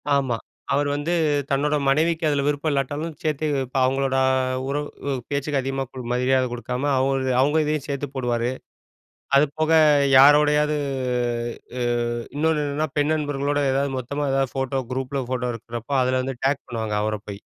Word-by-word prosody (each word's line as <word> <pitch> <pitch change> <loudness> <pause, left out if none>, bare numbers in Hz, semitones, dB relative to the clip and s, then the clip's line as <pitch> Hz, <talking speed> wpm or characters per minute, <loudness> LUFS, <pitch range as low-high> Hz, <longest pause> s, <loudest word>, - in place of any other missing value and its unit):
ஆமா, 135 -4 +1 0.4
அவர் 145 +1 +2
வந்து 145 +4 -1 0.4
தன்னோட 145 +2 +1
மனைவிக்கு 160 +4 +2
அதில 140 -1 +1
விருப்பம் 145 +1 0
இல்லாட்டாலும் 145 +4 -2
சேர்த்து, 155 -1 -1 0.2
இப்ப 130 +2 -5
அவங்களோட 135 0 0 0.5
உறவு 140 0 -3 0.2
பேச்சுக்கு 140 0 -1
அதிகமா 135 +1 -2
கு 130 -1 -7
மரியாத 130 +1 +2
குடுக்காம, 125 +4 -2
அவ 130 - +2 0.4
அவங்க 150 +3 +3
இதையும் 150 -2 -1
சேத்து 140 0 -3
போடுவாரு. 120 -2 0 0.9
அதுபோக 150 +2 +1 0.5
யாரோடையாவது, 150 +2 +5 1.0
ஆ - - -2 0.5
இன்னொன்னு 155 0 +1
என்னென்னா 145 +2 -1
பெண் 145 +1 +2
நண்பர்களோட 145 -1 -1
எதாவது 135 +1 0
மொத்தமா 140 +3 -2
ஏதாவது 135 -2 0
ஃபோட்டோ 135 0 -1
குரூப்ல 130 +1 -2
ஃபோட்டோ 125 -1 -1
எடுக்கிறப்போ, 115 +3 -6
அதில 130 0 +1
வந்து 135 0 -4
டேக் 140 0 0
பண்ணுவாங்க. 110 -3 -3
அவர 110 0 -1
போய். 100 0 -7
140 Hz, 145 wpm, -23 LUFS, 130-145 Hz, 1.0 s, யாரோடையாவது